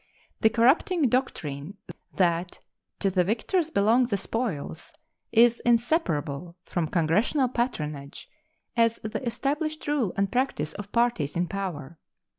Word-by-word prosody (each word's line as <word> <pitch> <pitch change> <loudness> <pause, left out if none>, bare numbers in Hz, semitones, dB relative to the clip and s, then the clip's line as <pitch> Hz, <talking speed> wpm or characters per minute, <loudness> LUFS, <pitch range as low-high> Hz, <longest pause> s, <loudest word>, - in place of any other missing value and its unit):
The 220 - +5
corrupting 270 - +3
doctrine 180 - -2 0.4
that 175 -1 +1 0.4
"to 195 - +2
the 185 -1 +3
victors 270 - 0
belong 230 +1 +3
the 205 -4 -1
spoils" 195 - -4 0.4
is 235 +1 +5
inseparable 175 - 0
from 170 -3 -1
Congressional 195 - +2
patronage 150 - -3 0.5
as 230 -1 +3
the 215 +5 -4
established 285 +7 -2
rule 280 -10 +1
and 200 0 +1
practice 245 - -1
of 205 0 -8
parties 235 -12 +1
in 175 +1 +1
power. 170 -6 -5
215 Hz, 120 wpm, -26 LUFS, 170-250 Hz, 0.5 s, The